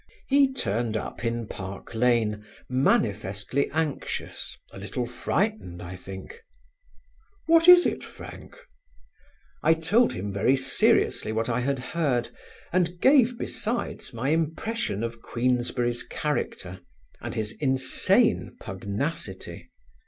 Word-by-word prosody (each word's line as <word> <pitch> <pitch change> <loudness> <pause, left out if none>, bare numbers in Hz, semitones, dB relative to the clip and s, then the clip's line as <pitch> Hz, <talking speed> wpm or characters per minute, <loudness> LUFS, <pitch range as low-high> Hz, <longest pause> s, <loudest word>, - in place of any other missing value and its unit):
He 275 -1 +4
turned 115 - -1
up 110 - -6
in 115 0 -1
Park 95 0 -8
Lane, 110 -3 +2 0.2
manifestly 105 -1 +1
anxious, 155 -2 -3 0.2
a - - -9
little 105 +5 -3
frightened, 120 - -1
I 90 +1 -7
think. 95 - -9 1.1
"What 330 +1 +5
is 360 0 +10
it, - - -1
Frank?" - - -10 1.1
I 160 - +4
told 190 +10 +3
him 100 +2 -4
very 125 +7 +3
seriously 130 -4 +2
what 110 +2 -1
I 120 +1 +1
had 135 +2 0 0.2
heard 140 -8 +1 0.4
and 180 -1 +1
gave 250 0 +5
besides 235 +1 -3
my 125 +4 -2
impression 160 - -1
of 115 0 -5
Queensberry's 120 0 0
character, 95 -11 -3 0.4
and - - -5
his 105 -1 -2
insane 130 -2 +2
pugnacity. 100 - -5
125 Hz, 115 wpm, -26 LUFS, 105-165 Hz, 1.1 s, is